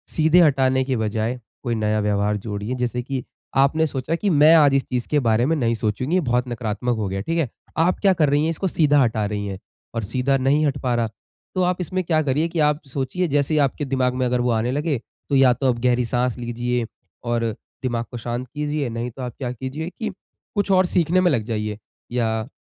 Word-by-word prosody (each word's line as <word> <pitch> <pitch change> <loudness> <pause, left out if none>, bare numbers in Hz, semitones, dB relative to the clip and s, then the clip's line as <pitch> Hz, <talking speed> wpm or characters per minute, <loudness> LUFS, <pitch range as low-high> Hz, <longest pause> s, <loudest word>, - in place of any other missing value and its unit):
सीधे 160 +2 +5
हटाने 130 -4 +3
के 130 0 -1
बजाए 110 +3 -1 0.2
कोई 120 -3 -1
नया 110 -1 0
व्यवहार 105 0 +1
जोड़िए 105 +3 -4
जैसे 125 -1 -2
कि 130 -1 -3 0.3
आपने 150 +4 +3
सोचा 135 +3 -2
कि 200 +4 -1
मैं 155 -1 +6
आज 145 -4 +6
इस 135 - +2
चीज़ 125 -2 -2
के 150 - +3
बारे 115 -2 +2
में 160 +4 +2
नहीं 115 -4 +1
सोचूँगी 115 - -1
ये 185 - +3
बहुत 125 -3 0
नकारात्मक 120 +1 -2
हो 105 -2 -1
गया, 95 +1 -3
ठीक 165 +11 -2
है? 140 -8 0 0.3
आप 165 +3 +2
क्या 195 -2 +4
कर 155 -5 +2
रही 145 +1 +2
हैं 160 - +1
इसको 180 +4 -2
सीधा 145 -4 +3
हटा 110 -4 +1
रही 105 0 -3
हैं, 95 -1 -5 0.4
और 115 - -1
सीधा 130 +6 +1
नहीं 140 +4 +2
हट 140 -1 0
पा 125 -2 +1
रहा। 115 -1 0 0.5
तो 185 - +1
आप 180 0 0
इसमें 185 +2 -2
क्या 160 -2 +2
करिए 145 +4 +1
कि 170 0 -4
आप 150 0 +2
सोचिए 135 +7 -2
जैसे 145 0 +1
ही - - +3
आपके 140 +1 +1
दिमाग 130 -1 +1
में 130 0 0
अगर 125 0 +1
वो 125 - +1
आने 115 +2 0
लगे 145 +1 0 0.3
तो 140 - +2
या 130 -2 +6
तो 135 +2 0
आप 120 - -8
गहरी 125 0 +2
साँस 125 0 0
लीजिए 120 0 -2 0.4
और 120 -1 0 0.4
दिमाग 120 -2 -1
को 120 - -5
शांत 120 +2 -4
कीजिए 150 -2 -1
नहीं 115 +1 -3
तो 130 - -10
आप 125 -2 -4
क्या 125 -3 -3
कीजिए 130 +7 -5
कि 220 - -2 0.5
कुछ 205 -1 +1
और 185 -1 +5
सीखने 175 +1 +2
में 180 -1 +3
लग 120 -6 +1
जाइए 105 -2 -3 0.3
या 110 -2 -1
130 Hz, 230 wpm, -22 LUFS, 120-150 Hz, 0.5 s, मैं